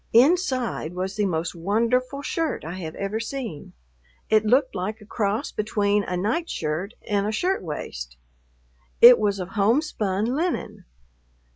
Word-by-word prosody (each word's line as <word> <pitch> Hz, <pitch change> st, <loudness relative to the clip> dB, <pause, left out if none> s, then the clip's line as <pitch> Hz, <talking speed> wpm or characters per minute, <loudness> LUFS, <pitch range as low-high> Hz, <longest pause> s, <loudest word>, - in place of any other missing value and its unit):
Inside 255 Hz, -, +2 dB
was 190 Hz, +2 st, -3 dB
the 210 Hz, -2 st, +1 dB
most 165 Hz, -2 st, -2 dB
wonderful 235 Hz, +10 st, 0 dB
shirt 325 Hz, -, -2 dB
I 175 Hz, +3 st, -6 dB
have 160 Hz, -3 st, -6 dB
ever 200 Hz, +2 st, -3 dB
seen; 230 Hz, -, -6 dB, 0.6 s
it 215 Hz, -1 st, +5 dB
looked 255 Hz, +5 st, +3 dB
like 210 Hz, +5 st, -3 dB
a 210 Hz, -, -14 dB
cross 210 Hz, 0 st, -1 dB
between 205 Hz, -1 st, +1 dB
a 180 Hz, -, -2 dB
nightshirt 200 Hz, -, -2 dB
and 205 Hz, -1 st, +1 dB
a -, -, 0 dB
shirt 360 Hz, -, 0 dB
waist. -, -, -6 dB, 0.8 s
It 240 Hz, +1 st, +10 dB
was 205 Hz, -2 st, +1 dB
of 180 Hz, 0 st, -4 dB
homespun 210 Hz, -2 st, +1 dB
linen. 310 Hz, +9 st, -2 dB
210 Hz, 140 wpm, -24 LUFS, 185-250 Hz, 0.8 s, It